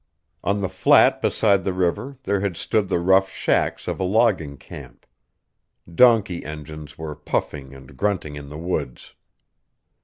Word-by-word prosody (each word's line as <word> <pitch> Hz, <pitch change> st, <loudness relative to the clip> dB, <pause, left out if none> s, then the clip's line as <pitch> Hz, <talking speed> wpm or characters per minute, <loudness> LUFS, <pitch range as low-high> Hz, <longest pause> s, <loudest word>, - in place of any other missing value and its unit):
On 100 Hz, +1 st, 0 dB
the 95 Hz, -, 0 dB
flat -, -, +4 dB
beside 100 Hz, -4 st, +2 dB
the 95 Hz, -, -1 dB
river 95 Hz, +10 st, -2 dB
there 100 Hz, -4 st, 0 dB
had 95 Hz, -3 st, -3 dB
stood 105 Hz, -3 st, 0 dB
the 95 Hz, -, +1 dB
rough 95 Hz, +2 st, +3 dB
shacks -, -, -1 dB
of -, -, -3 dB
a -, -, -1 dB
logging 95 Hz, -8 st, +1 dB
camp. -, -, -12 dB, 0.9 s
Donkey 110 Hz, -5 st, +4 dB
engines 75 Hz, 0 st, -9 dB
were 80 Hz, -1 st, -6 dB
puffing 70 Hz, -2 st, -4 dB
and 65 Hz, -1 st, -14 dB
grunting 95 Hz, -8 st, -2 dB
in 70 Hz, -1 st, -9 dB
the 75 Hz, -, -8 dB
woods. 85 Hz, -7 st, -4 dB
90 Hz, 150 wpm, -22 LUFS, 75-100 Hz, 0.9 s, flat